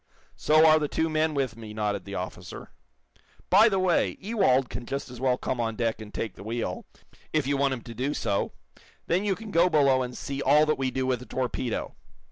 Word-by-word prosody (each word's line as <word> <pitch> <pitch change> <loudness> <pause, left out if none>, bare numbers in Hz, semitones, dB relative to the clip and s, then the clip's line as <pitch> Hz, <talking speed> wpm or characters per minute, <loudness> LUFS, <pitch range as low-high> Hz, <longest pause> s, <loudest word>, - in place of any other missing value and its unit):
"So 155 +1 +4
are 155 0 +6
the 150 - -1
two 160 +2 -1
men 155 0 +1
with 130 -5 -1
me," 110 -2 -9
nodded 105 -3 -2
the 100 0 -6
officer. 90 -1 -7 0.8
"By 210 +5 +7
the 195 - 0
way, 185 -2 +1
Ewald 190 - +2
can 120 - -7
just 140 -2 -4
as 125 -1 -10
well 130 -2 +2
come 130 - -3
on 115 -1 -1
deck 115 -1 -1
and 105 -1 -9
take 110 -2 -4
the - - -12
wheel, 115 +2 -4 0.5
if 155 -3 +1
you 140 +1 +1
want 140 -1 +1
him 120 - -9
to 120 - -9
do 130 +6 -2
so. 100 -1 -1 0.5
Then 185 +4 0
you 195 -2 +1
can 220 0 -9
go 170 +1 +4
below 140 -5 +4
and 125 -1 -5
see 140 0 -4
all 150 +3 +5
that 155 -2 0
we 130 -1 0
do 130 +1 -2
with 130 -2 0
a 125 - -11
torpedo." 125 -1 -3
130 Hz, 225 wpm, -27 LUFS, 115-155 Hz, 0.8 s, By